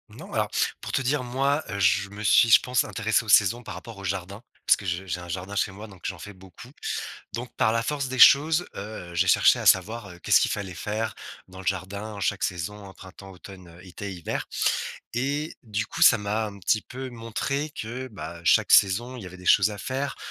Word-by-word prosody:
Non, - - -12
alors, - - 0 0.3
pour - - -6
te - - 0
dire, 130 +1 0
moi, 135 +5 0
je 95 +1 +2
me 100 +1 -9
suis, 115 +2 +5
je 110 - +8
pense, 125 0 +1
intéressé 110 +2 0
aux 110 - -10
saisons 105 +4 +4
par - - -7
rapport 115 -3 -10
au 100 - -10
jardin, 95 +2 -4 0.3
parce - - +7
que 100 - -11
je 90 +1 -2
j'ai 90 -1 -3
un 90 - -10
jardin 95 +4 -5
chez 100 - +1
moi 105 +3 -10
donc 95 -4 -15
j'en 95 - -4
fais 105 - -9
beaucoup. 95 +5 -14 0.6
Donc, 120 +1 -6
par 110 - +3
la 115 0 0
force 140 0 -2
des 130 0 -4
choses, 155 +7 +7
heu, 100 -4 -7
j'ai 85 - +2
cherché - - +5
à - - -5
savoir, 100 +3 +3
heu, 90 -1 -13
qu'est-ce - - +4
qu'il - - +1
fallait 95 -3 -4
faire 105 +5 -3 0.4
dans 95 0 -12
le 95 - -10
jardin 100 +3 -3
en 100 - -8
chaque 100 0 -1
saison, 95 +3 -4
printemps, 95 0 -13
automne, 90 -2 -13
été, 95 +2 -7
hiver. 85 -3 -4 0.7
Et 140 +6 -2
du 110 -1 -3
coup, - - -8
ça - - +8
m'a 105 +2 -1
un 100 -1 -9
petit 100 +3 +1
peu 130 +1 -8
montré 125 +6 -3
que, 130 -1 -6
bah, 85 -6 -8
chaque - - +4
saison, 115 +6 +4
il 120 - -8
y - - -8
avait 90 0 -10
des 90 -1 -13
choses 100 +1 +5
à 105 - -7
faire, 135 +5 -3
105 Hz, 225 wpm, -25 LUFS, 95-120 Hz, 0.7 s, je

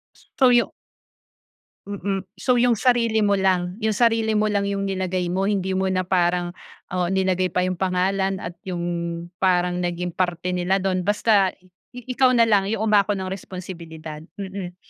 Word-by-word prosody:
S - - -24
so 260 - +7
yu 240 -1 +3 1.2
mm, 195 -1 -3
so 245 +5 +1
yung 245 0 +4
sarili 230 -1 +2
mo 200 -1 +3
lang, 185 -1 +1
yung 220 -1 0
sarili 225 -1 +2
mo 215 0 +2
lang 200 -1 0
yung 200 0 -2
nilagay 185 -2 -1
mo 190 +2 0
hindi 190 -2 0
mo 190 - 0
na 185 -1 +1
parang 175 -1 +1 0.4
oo 180 -1 0
nilagay 185 -2 +1
pa 180 - +2
yung 185 0 -1
pangalan 190 +1 0
at 170 +1 -7
yung 180 -2 -3 0.6
parang 180 -1 +2
naging 175 0 -2
parte 175 0 -2
nila 180 +2 0
dun 185 -2 -1
basta 205 -2 +3
i 185 - -24 0.4
ikaw 255 0 +3
nalang 210 -4 +4
yung 220 - -1
umako 205 -1 +4
ng 190 -1 -4
responsibilidad. 170 -5 -8 0.2
Mm. 190 -2 -6
190 Hz, 165 wpm, -23 LUFS, 180-205 Hz, 1.2 s, so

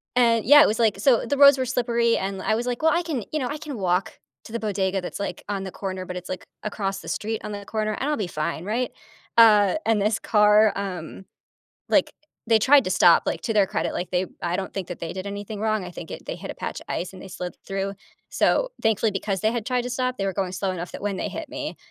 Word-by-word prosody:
and 230 -3 +3
yeah, 290 +5 +9
it - - +6
was, 215 - -1
like 215 -4 +2
so 245 +1 +3
the 285 - -1
roads 280 -1 +8
were 260 - 0
slippery, 235 -2 +1
and 190 0 -3
I 220 - +1
was, 235 +2 -2
like, 245 -1 -2
"Well, 320 +1 +4
I 345 - +2
can, 295 -10 -3
you 310 - -1
know 255 - -1
I 295 - -4
can 295 -4 -7
walk 185 -1 -1 0.3
to - - -11
the 235 - -3
bodega, 195 -2 -1
that's, 180 - -6
like, 200 - -4
on 195 -1 -2
the 190 - -6
corner, 190 -2 -5
but 180 - -6
it's, 180 0 -7
like, 185 - -5 0.2
across 195 -2 -3
the - - -12
street 220 +1 -3
on 210 - -5
the 205 -1 -6
corner, 215 0 -2
I'll 295 +3 0
be 205 -5 -2
fine, 155 0 -3
right?" 235 +5 -1 0.5
Uh, 210 -3 +7
and 225 -2 +2
this 210 +2 +2
car, 210 0 +4
um, 190 -2 -5 0.6
like - - +3 0.4
they 225 - +5
tried 275 +4 +6
to - - -1
stop, 175 -2 +6
like, - - -1
to 225 - -2
their 205 -2 +4
credit, - - -2
like, 175 - -3
they 180 +1 +1 0.2
I 175 0 -1
don't 190 +1 -4
think 190 -3 -4
that 175 - -6
they 165 -1 -5
did 185 +1 -5
anything 205 +1 -6
wrong. 215 -2 0
I 180 - -8
think 165 -2 -9
it - - -8
they - - -4
hit - - -9
a - - -10
patch - - -5
of - - -14
ice 180 - -3
and 185 - -11
they - - -9
slid 180 -1 -6
through. 195 0 -2 0.4
So, - - +2
thankfully, 220 0 +2
because 195 0 -2
they 220 - +2
had 235 -2 -3
tried 250 -1 0
to 245 - -4
stop, 255 0 -1
they 195 - -1
were 195 - -1
going 190 -1 -2
slow 190 0 -1
enough 175 -1 -5
that - - -7
when 200 -1 -2
they - - -2
hit - - -6
me, - - -5
210 Hz, 270 wpm, -24 LUFS, 190-235 Hz, 0.6 s, yeah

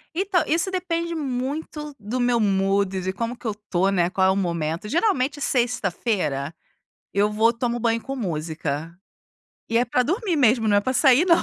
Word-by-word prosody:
Então, 370 -2 +1
isso 335 +4 +1
depende 340 -2 -2
muito 295 +2 -4
do 220 +5 -4
meu 245 -1 +2
mood, 195 -2 +1
de 190 +1 -2
como 230 +4 -3
que 250 - -19
eu 220 - 0 0.2
tô, 185 +2 +2
né, 175 -3 +2
qual 190 0 +2
é - - +4
o - - 0
momento, 170 0 -2
geralmente, 295 - +1
sexta-feira 210 - -1 0.6
eu 205 +1 +2
vou, 220 +2 +3
tomo 240 0 -2
banho 230 0 +1
com 270 - -5
música, 160 - -3 0.7
e 230 - +2
é 245 - +3
para 250 +1 +1
dormir 365 - -1
mesmo, 230 -4 +3
não 205 - +4
é - - +5
para 255 +5 -1
sair 265 +3 +5
não. 340 -2 +4
235 Hz, 185 wpm, -23 LUFS, 195-285 Hz, 0.7 s, é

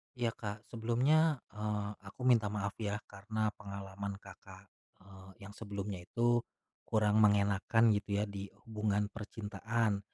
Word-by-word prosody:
Iya, 120 -2 +1
Kak, 105 -1 -6
sebelumnya, 130 +6 +3
eee, 105 0 -2 0.2
aku 100 - -11
minta 120 -4 +5
maaf 100 0 -2
ya 105 -1 -1 0.2
karena 110 +2 -1
pengalaman 100 -1 -5
Kakak, - - -13 0.4
eee, 95 -1 -13
yang 100 - -8
sebelumnya 100 -2 -5
itu, 120 +2 +3 0.5
kurang 105 -1 +3
mengenakkan 105 +2 +5
gitu 105 -1 0
ya - - +3
di 100 -1 -5 0.2
hubungan 105 -2 0
percintaan 110 0 -1
105 Hz, 130 wpm, -34 LUFS, 100-115 Hz, 0.5 s, minta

